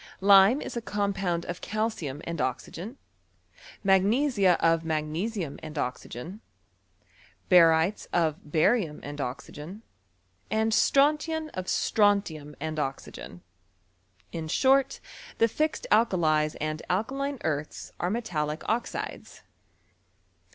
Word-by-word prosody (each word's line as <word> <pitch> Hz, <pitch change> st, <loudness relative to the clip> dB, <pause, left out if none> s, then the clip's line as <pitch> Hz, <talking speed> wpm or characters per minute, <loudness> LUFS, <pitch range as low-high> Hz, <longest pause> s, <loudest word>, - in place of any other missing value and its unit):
Lime 200 Hz, +6 st, +6 dB
is -, -, -7 dB
a 235 Hz, -, -2 dB
compound 195 Hz, -5 st, -1 dB
of 175 Hz, 0 st, -6 dB
calcium 210 Hz, -10 st, -3 dB
and 170 Hz, -2 st, -4 dB
oxygen, 170 Hz, -, -4 dB, 0.9 s
mag 190 Hz, -1 st, +5 dB
nesia 210 Hz, -, +3 dB
of 165 Hz, 0 st, +3 dB
magnesium 160 Hz, +3 st, -3 dB
and 155 Hz, -1 st, -8 dB
oxygen, 130 Hz, -, -5 dB, 1.1 s
barytes 165 Hz, +2 st, +5 dB
of 160 Hz, -3 st, +1 dB
bariutu 160 Hz, +2 st, +1 dB
and 145 Hz, 0 st, -6 dB
oxygen, 150 Hz, -, -7 dB, 0.7 s
and 220 Hz, +1 st, +1 dB
strontian 305 Hz, +6 st, +2 dB
of 185 Hz, 0 st, -5 dB
sfronf 205 Hz, -5 st, +2 dB
lum 150 Hz, -1 st, -11 dB
and 155 Hz, +1 st, -3 dB
oxygen. 135 Hz, -10 st, -6 dB, 0.9 s
In 160 Hz, -1 st, -5 dB
short, 270 Hz, -, +3 dB, 0.4 s
the 230 Hz, -, +4 dB
fixed 310 Hz, -, -1 dB
alkalies 155 Hz, -9 st, +3 dB
and 155 Hz, +1 st, -3 dB
alkaline 270 Hz, +9 st, -1 dB
earths, 150 Hz, -1 st, -3 dB
are 175 Hz, -, 0 dB
metallic 160 Hz, -9 st, -3 dB
oxides. 230 Hz, +2 st, -4 dB
180 Hz, 110 wpm, -27 LUFS, 155-220 Hz, 1.1 s, Lime